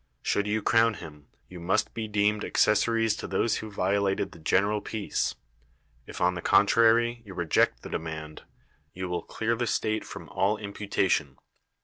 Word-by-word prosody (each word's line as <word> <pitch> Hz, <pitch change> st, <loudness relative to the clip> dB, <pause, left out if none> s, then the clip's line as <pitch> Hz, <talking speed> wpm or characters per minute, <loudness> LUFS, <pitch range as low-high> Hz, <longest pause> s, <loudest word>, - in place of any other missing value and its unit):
Should 100 Hz, 0 st, 0 dB
you 110 Hz, +1 st, -1 dB
crown 115 Hz, 0 st, +3 dB
him, 75 Hz, -5 st, -11 dB, 0.2 s
you 90 Hz, -, -10 dB
must 95 Hz, +5 st, 0 dB
be 110 Hz, -1 st, -4 dB
deemed 105 Hz, 0 st, +1 dB
accessories 115 Hz, +1 st, +2 dB
to -, -, -6 dB
those 105 Hz, +4 st, 0 dB
who 110 Hz, -, -6 dB
violated 100 Hz, 0 st, 0 dB
the -, -, -14 dB
general 100 Hz, +6 st, +1 dB
peace: 105 Hz, -1 st, -2 dB, 0.7 s
if, -, -, -8 dB
on 90 Hz, +1 st, +2 dB
the 90 Hz, -, -5 dB
contrary, 115 Hz, +4 st, +4 dB
you 100 Hz, -4 st, -11 dB
reject 85 Hz, -3 st, +1 dB
the -, -, -7 dB
demand, 80 Hz, -1 st, -6 dB, 0.5 s
you 95 Hz, 0 st, -4 dB
wil] 90 Hz, -1 st, -2 dB
clear 115 Hz, +6 st, -2 dB
the 120 Hz, 0 st, -2 dB
state 110 Hz, 0 st, -1 dB
from -, -, -9 dB
all 100 Hz, +3 st, +1 dB
imputation. 100 Hz, -2 st, -1 dB
100 Hz, 160 wpm, -27 LUFS, 90-110 Hz, 0.7 s, contrary